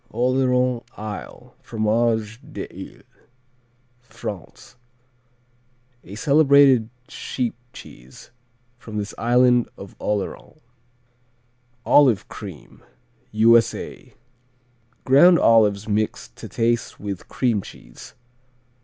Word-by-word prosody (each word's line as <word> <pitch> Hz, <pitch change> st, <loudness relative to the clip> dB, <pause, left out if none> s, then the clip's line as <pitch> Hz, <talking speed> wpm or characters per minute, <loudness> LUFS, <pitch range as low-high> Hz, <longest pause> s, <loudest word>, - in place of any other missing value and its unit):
Oléron 125 Hz, 0 st, +1 dB
Isle, 105 Hz, -1 st, -9 dB
Fromage 110 Hz, 0 st, -1 dB
d'Ile -, -, -10 dB, 1.0 s
France 110 Hz, -4 st, -10 dB, 1.3 s
A 95 Hz, -, -11 dB
celebrated 140 Hz, -3 st, +4 dB, 0.2 s
sheep 125 Hz, -3 st, -4 dB, 0.2 s
cheese 65 Hz, -, -14 dB, 0.5 s
from 110 Hz, -3 st, -8 dB
this 105 Hz, 0 st, -4 dB
island 125 Hz, 0 st, +3 dB
of 100 Hz, -, -11 dB
Oléron. 105 Hz, +8 st, -4 dB, 1.3 s
Olive 130 Hz, -9 st, +4 dB
Cream -, -, -11 dB, 0.5 s
U.S.A. 115 Hz, +1 st, +1 dB, 0.9 s
Ground 170 Hz, +7 st, +6 dB
olives 105 Hz, -5 st, +3 dB
mixed 105 Hz, 0 st, -2 dB
to -, -, -10 dB
taste 120 Hz, +1 st, -1 dB
with 100 Hz, -3 st, -6 dB
cream 120 Hz, -6 st, 0 dB
cheese. -, -, -14 dB
115 Hz, 80 wpm, -22 LUFS, 105-125 Hz, 1.3 s, Ground